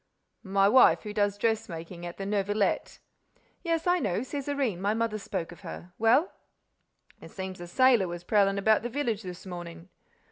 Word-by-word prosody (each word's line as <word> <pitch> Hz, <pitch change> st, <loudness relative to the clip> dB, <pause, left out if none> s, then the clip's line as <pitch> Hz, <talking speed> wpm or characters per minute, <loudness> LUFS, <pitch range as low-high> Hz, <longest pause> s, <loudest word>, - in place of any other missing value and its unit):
"My 195 Hz, -1 st, +2 dB
wife—who 215 Hz, -2 st, +5 dB
does 205 Hz, -1 st, +1 dB
dressmaking 175 Hz, -6 st, -3 dB
at 175 Hz, -, -9 dB
the 195 Hz, -, -5 dB
Neuvillette—" 205 Hz, 0 st, 0 dB, 0.6 s
"Yes, 330 Hz, -2 st, -1 dB
I 355 Hz, 0 st, +3 dB
know—Césarine—my 240 Hz, -, -1 dB
mother 225 Hz, -1 st, -1 dB
spoke 185 Hz, -4 st, -4 dB
of 175 Hz, -, -13 dB
her. 175 Hz, 0 st, -9 dB
Well?" 235 Hz, -, +4 dB, 0.9 s
"It -, -, -11 dB
seems 190 Hz, -2 st, -7 dB
a 175 Hz, -, -7 dB
sailor 240 Hz, +1 st, +4 dB
was 175 Hz, 0 st, -6 dB
prowling 200 Hz, 0 st, +2 dB
about 215 Hz, +2 st, +3 dB
the 240 Hz, -, -4 dB
village 235 Hz, -5 st, -2 dB
this 180 Hz, -2 st, -9 dB
morning." 175 Hz, -1 st, -8 dB
205 Hz, 150 wpm, -28 LUFS, 180-230 Hz, 0.9 s, wife—who